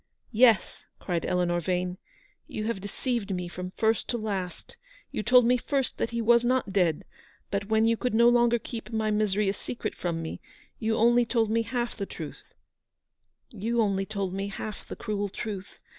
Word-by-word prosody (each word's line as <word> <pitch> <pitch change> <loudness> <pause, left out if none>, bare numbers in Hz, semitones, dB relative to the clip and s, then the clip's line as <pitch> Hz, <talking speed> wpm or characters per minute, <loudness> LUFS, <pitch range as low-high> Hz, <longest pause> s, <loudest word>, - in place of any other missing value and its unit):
" - - -39
Yes," 225 -7 +2
cried 175 -3 -2
Eleanor 175 -1 +1
Yane, 180 +1 -1 0.3
" - - -36
you 215 - -4
have 220 -3 -2
deceived 205 0 -2
me 180 -1 -3
from 180 +1 -6
first 220 0 +2
to 240 - 0
last. 195 -5 -4 0.4
You - - -2
told 250 +2 +6
me 250 +1 +4
first 270 0 -1
that - - 0
he 235 -1 -2
was 235 +1 +5
not 245 -5 +1
dead; 175 -6 +2 0.5
but 200 +1 -1
when 220 0 +3
you 230 0 +4
cou]d 250 -1 -1
no 235 +1 +7
longer 240 0 +5
keep 230 +1 -7
my 220 -1 0
misery 210 -1 +1
a 195 - +2
secret 240 - -5
from 165 -2 -3
me, 160 - -6 0.4
you 220 0 +1
only 240 +2 +5
told 225 -2 +1
me 230 +1 +3
half 240 +1 -2
the 200 -3 -4
truth - - -9 0.5
— - - -51 0.2
you 235 +1 +1
only 195 -3 +1
told 200 -3 -2
me 195 +1 -2
half 205 +1 -6
the - - -6
cruel 205 -2 -2
truth. 200 -1 -6
215 Hz, 195 wpm, -28 LUFS, 195-235 Hz, 0.5 s, no